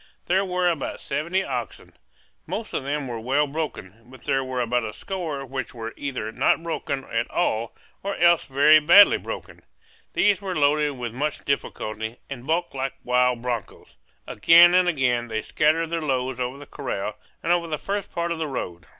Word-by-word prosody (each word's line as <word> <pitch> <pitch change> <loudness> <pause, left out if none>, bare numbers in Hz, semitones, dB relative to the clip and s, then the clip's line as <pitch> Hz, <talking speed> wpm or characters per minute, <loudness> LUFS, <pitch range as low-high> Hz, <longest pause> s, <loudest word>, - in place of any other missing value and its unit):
There 190 +2 +2
were 180 -1 0
about 165 -5 -2
seventy 170 +7 -1
oxen. - - -5 0.5
Most 225 - -5
of - - -2
them 140 0 -2
were 120 -2 -4
well 135 +6 +1
broken, 140 -9 -5
but 130 -2 -15
there 135 0 +1
were 130 -1 -4
about 120 0 0
a 110 -1 -5
score 165 -8 -5
which 130 -1 -5
were 115 -1 -6
either 130 -6 -4
not 165 - +2
broken 140 -4 -3
at 115 -2 -2
all 115 -10 -1 0.3
or 200 0 -3
else 170 0 +4
very 145 +3 +6
badly 175 +7 +7
broken. - - -8 0.5
These 205 -1 +3
were 190 -2 -4
loaded 150 0 +2
with 120 -2 -5
much 150 +4 -3
difficulty, 110 -4 -3
and 130 -1 -7
bucked 170 +2 0
like 135 0 -3
wild 125 -1 +2
broncos. 120 -5 -5 0.3
Again 170 +10 +6
and 180 -1 +4
again 125 -6 +1
they 110 -1 -3
scattered 160 +2 +1
their 165 -1 -1
loads 130 -3 -1
over 125 +2 -3
the 145 - -11
corral 115 -8 -4 0.3
and 165 - +1
over 175 -1 +2
the 155 -2 -2
first 200 +3 -4
part 170 0 -2
of 165 - -3
the 160 - -1
road. 90 -11 -5
140 Hz, 185 wpm, -24 LUFS, 125-170 Hz, 0.5 s, badly